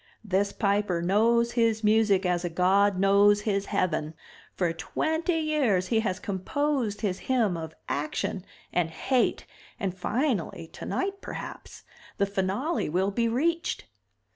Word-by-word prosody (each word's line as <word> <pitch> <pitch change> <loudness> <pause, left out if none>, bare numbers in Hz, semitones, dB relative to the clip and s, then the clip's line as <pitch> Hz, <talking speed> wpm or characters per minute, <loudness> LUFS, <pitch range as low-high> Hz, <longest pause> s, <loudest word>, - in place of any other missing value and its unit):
This 200 0 +1
Piper 200 -4 0
knows 230 +5 +3
his 230 -2 +1
music 210 -3 +3
as 180 -1 +1
a 175 - -1
god 190 +3 +3
knows 200 +1 +5
his 200 -2 -1
heaven. 155 -3 -1 0.4
For 175 -3 0
twenty 320 - -1
years 275 - +1
he 225 - +3
has 190 -4 -1
composed 225 +3 -1
his 195 -4 -1
hymn 230 -8 +2
of 160 -1 -6
action 150 +5 -2 0.3
and 175 -2 +1
hate 250 +10 0 0.3
and 190 -3 -2
finally, 205 - -1
tonight 395 +1 -3
perhaps, - - -8 0.3
the 200 - +3
finale 200 - -1
will 185 +5 +1
be 230 +3 +1
reached. 330 +9 0
200 Hz, 135 wpm, -27 LUFS, 185-235 Hz, 0.4 s, knows